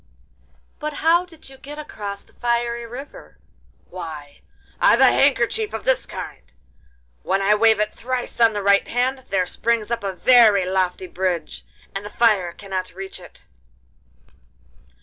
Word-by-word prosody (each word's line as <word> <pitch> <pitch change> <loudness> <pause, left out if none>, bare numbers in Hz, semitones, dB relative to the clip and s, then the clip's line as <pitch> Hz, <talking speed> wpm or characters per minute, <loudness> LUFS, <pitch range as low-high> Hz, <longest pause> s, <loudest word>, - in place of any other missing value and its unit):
'But 305 0 -4
how 340 +2 +4
did 330 -3 -15
you 270 0 -13
get 290 +2 -10
across 205 -9 -7
the - - -26
fiery 235 -1 -1
river?' 265 +5 -10 0.5
'Why, 155 -5 -9 0.4
I've - - +5
a - - +7
handkerchief 285 - +2
of - - -6
this - - +1
kind—when 60 - -7
I 195 +1 +3
wave 220 0 +4
it 210 0 0
thrice 245 -1 -4
on 225 -1 +6
the 205 -1 -3
right 200 0 +4
hand, 260 +2 -1
there 190 -2 +1
springs 230 +3 -1
up 235 -3 -2
a 195 -1 -2
very 215 -2 +5
lofty 185 0 -1
bridge, 180 -3 -3 0.3
and 195 - -4
the 205 - -7
fire 210 -6 +2
cannot 185 -1 -6
reach 195 0 -7
it. - - -15
210 Hz, 150 wpm, -22 LUFS, 190-245 Hz, 0.5 s, a